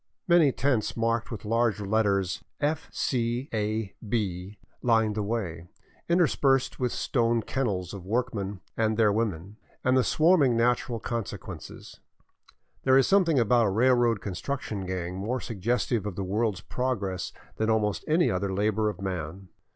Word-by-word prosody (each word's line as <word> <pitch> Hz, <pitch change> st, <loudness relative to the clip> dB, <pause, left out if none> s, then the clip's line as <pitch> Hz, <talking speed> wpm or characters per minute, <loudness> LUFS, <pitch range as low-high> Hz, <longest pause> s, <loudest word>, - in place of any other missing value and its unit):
Many 170 Hz, -5 st, +5 dB
tents 125 Hz, -4 st, 0 dB
marked 115 Hz, +1 st, 0 dB
with 110 Hz, -2 st, -7 dB
large 115 Hz, -1 st, +1 dB
letters 100 Hz, -3 st, 0 dB
" -, -, -54 dB
F. 160 Hz, 0 st, -13 dB
C. 120 Hz, +1 st, -1 dB
A. 110 Hz, -1 st, -1 dB
B." 100 Hz, -3 st, -3 dB, 0.2 s
lined 110 Hz, -3 st, +3 dB
the 105 Hz, -, -2 dB
way, 100 Hz, -6 st, -3 dB, 0.4 s
interspersed 145 Hz, -6 st, +2 dB
with 125 Hz, -1 st, +1 dB
the -, -, -4 dB
stone 115 Hz, -3 st, +1 dB
kennels 100 Hz, -10 st, -2 dB
of 100 Hz, -3 st, -7 dB
workmen 105 Hz, -3 st, -2 dB
and 110 Hz, -1 st, +1 dB
their 110 Hz, -2 st, +4 dB
women, 100 Hz, -2 st, -2 dB, 0.3 s
and 130 Hz, 0 st, +3 dB
the 130 Hz, -, +4 dB
swarming 155 Hz, -7 st, +4 dB
natural 120 Hz, 0 st, +1 dB
con 115 Hz, -3 st, -3 dB
sequences. -, -, -9 dB, 0.8 s
There 130 Hz, 0 st, +5 dB
is 135 Hz, -, +5 dB
something 180 Hz, -6 st, +3 dB
about 120 Hz, -1 st, +4 dB
a -, -, +2 dB
railroad 120 Hz, 0 st, +3 dB
construction 100 Hz, 0 st, -4 dB
gang 90 Hz, -1 st, -3 dB
more 115 Hz, +7 st, -2 dB
suggestive 115 Hz, 0 st, -1 dB
of 100 Hz, -, -5 dB
the 100 Hz, -, -3 dB
world's 105 Hz, +1 st, -1 dB
progress 105 Hz, -8 st, -2 dB, 0.3 s
than 110 Hz, 0 st, 0 dB
almost 105 Hz, -2 st, +1 dB
any 165 Hz, +3 st, +3 dB
other 95 Hz, +1 st, -1 dB
labor 105 Hz, +2 st, +1 dB
of 100 Hz, -2 st, -7 dB
man. 90 Hz, 0 st, -5 dB
110 Hz, 155 wpm, -27 LUFS, 100-125 Hz, 0.8 s, Many